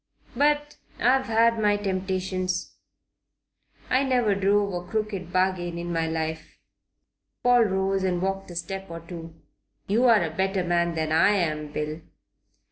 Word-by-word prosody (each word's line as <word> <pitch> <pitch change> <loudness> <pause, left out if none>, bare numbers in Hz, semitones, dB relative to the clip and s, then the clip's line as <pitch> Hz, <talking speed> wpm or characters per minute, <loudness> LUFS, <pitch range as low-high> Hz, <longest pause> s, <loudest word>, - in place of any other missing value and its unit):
But 295 0 +1 0.2
I've 260 +2 +2
had 230 0 +3
my 210 -1 +3
temptations. 185 -2 -2 1.1
I 255 - +2
never 250 -6 +2
drove 200 0 +1
a 175 0 -5
crooked 210 -5 -3
bargain 185 -2 0
in 170 0 -4
my 165 -1 0
life." 160 0 -4 0.9
Paul 245 -1 +5
rose 190 -1 0
and 180 -2 0
walked 195 +1 -2
a 175 - -9
step 190 +3 -5
or 165 0 -7
two. 165 -1 -9 0.5
"You're 225 -1 +4
a 165 - -3
better 190 0 0
man 170 -1 +1
than 160 -1 -1
I 165 +6 +5
am, 155 -5 -1
Bill." 150 +2 -4
190 Hz, 140 wpm, -25 LUFS, 170-210 Hz, 1.1 s, Paul